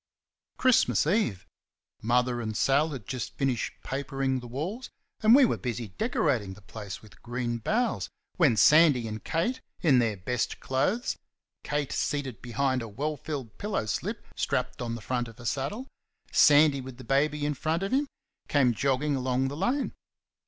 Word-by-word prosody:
Christmas 230 - +4
Eve. 155 - +1 0.6
Mother 120 +1 +1
and 110 -2 -3
Sal 145 +4 +3
had 135 -9 -7
just 125 +1 -5
finished 135 -4 0
papering 135 -1 -2
the 120 - -9
walls, 170 - -4 0.3
and 220 +2 +7
we 275 -1 +7
were - - 0
busy 120 -3 -4
decorating 120 - 0
the 105 - -17
place 100 +1 -8
with 110 - -17
green 120 -1 -3
boughs, 230 - 0 0.3
when 145 - +4
Sandy 150 -4 +6
and 110 0 -6
Kate, 235 +11 -1 0.2
in 140 -7 +5
their 110 -4 +1
best 125 +7 -2
clothes 185 - 0 0.5
Kate 145 -2 -2
seated 135 -8 -2
behind 130 +2 0
a 115 - -5
well 145 +9 -3
filled 140 -7 -6
pillow 205 - -1
slip 105 - -3
strapped - - -1
on 115 -1 -2
the 115 - -8
front 120 +2 -2
of 115 0 -13
her 120 - -11
saddle; 140 - -2 0.4
Sandy 145 -2 +6
with 130 -1 -9
the 130 - -10
baby 145 +4 +1
in 150 - 0
front 160 +5 -1
of 195 - -2
him 280 +2 +2 0.4
came 130 -4 +3
jogging 140 +4 +1
along 130 0 0
the 140 - -6
lane. 245 - 0
135 Hz, 165 wpm, -28 LUFS, 120-155 Hz, 0.6 s, and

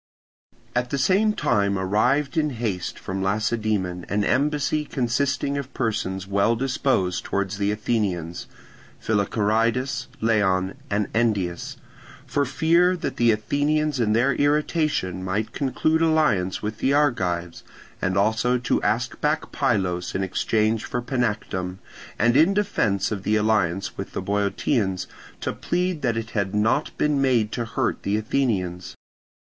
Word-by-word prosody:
At 125 0 0
the 140 - -1
same 195 +10 +3
time 100 - +1
arrived 125 - +1
in 155 -2 +2
haste 100 -7 -3
from 95 0 -4
Lacedaemon 105 -3 -1
an 105 +1 +1
embassy 150 +4 +1
consisting 140 +1 -1
of 140 -1 -8
persons 95 -5 -1
reputed 95 - -14
well 100 +4 +3
disposed 125 -7 0
towards 100 0 -2
the 100 0 +1
Athenians—Philocharidas, 110 +4 -2
Leon, 95 -4 +1 0.2
and 100 0 0
Endius—for 110 +5 -2
fear 170 +6 +3
that - - -4
the 120 -1 +4
Athenians 145 +6 0
in 110 -3 +2
their 125 +5 +3
irritation 145 - 0
might 100 +4 -2
conclude 155 +4 +1
alliance 150 - +2
with 105 +1 -4
the 135 - +2
Argives, 90 - 0 0.4
and 95 0 0
also 110 +5 +2
to 120 - 0
ask 115 +3 -1
back 150 +1 0
Pylos 95 -9 0
in 95 - 0
exchange 110 +3 0
for 125 - -3
Panactum, 105 -7 -2 0.4
and 120 +1 +3
in 165 +7 +5
defence 110 - +1
of 105 -2 -2
the 105 +2 +1
alliance 105 -4 0
with - - -6
the - - -3
Boeotians 100 -1 0 0.4
to - - -2
plead 180 -2 -1
that 115 -3 0
it 115 0 -4
had 100 -2 -1
not 115 +8 +2
been 150 -2 +1
made 120 -5 +2
to 120 - -2
hurt 110 - -1
the 100 +2 0
Athenians. 100 -7 -1
110 Hz, 135 wpm, -24 LUFS, 100-140 Hz, 0.4 s, in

